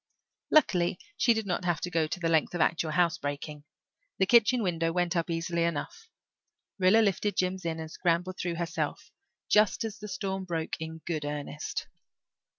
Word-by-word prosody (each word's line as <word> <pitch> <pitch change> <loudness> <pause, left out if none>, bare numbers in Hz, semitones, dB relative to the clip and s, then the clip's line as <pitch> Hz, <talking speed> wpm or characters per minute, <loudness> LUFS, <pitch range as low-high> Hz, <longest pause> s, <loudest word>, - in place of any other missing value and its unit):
Luckily 180 - +3 0.2
she 240 - +3
did 220 -1 -2
not 180 -2 -2
have 175 -2 0
to 180 - -3
go 165 -2 +1
to 175 - -4
the 170 - 0
length 165 +1 +2
of 175 - 0
actual 160 0 +1
housebreaking. 150 -3 -1 0.5
The 190 - +3
kitchen 235 +3 +5
window 165 -3 0
went 175 +1 0
up 170 -1 +1
quite 170 - -1
easily. 170 0 0 1.1
Rilla 190 +4 +6
lifted 205 0 0
Jims 185 0 0
in 165 -1 -2
and 160 0 -6
scrambled 180 +2 0
through 175 -1 -2
herself, 170 0 -3 0.4
just 210 0 +3
as 220 -2 -5
the 210 - -7
storm 190 -1 -3
broke 165 -3 -3
in 160 0 -7
good 155 -3 -2
earnest. 145 0 -4
175 Hz, 170 wpm, -29 LUFS, 160-190 Hz, 1.1 s, Rilla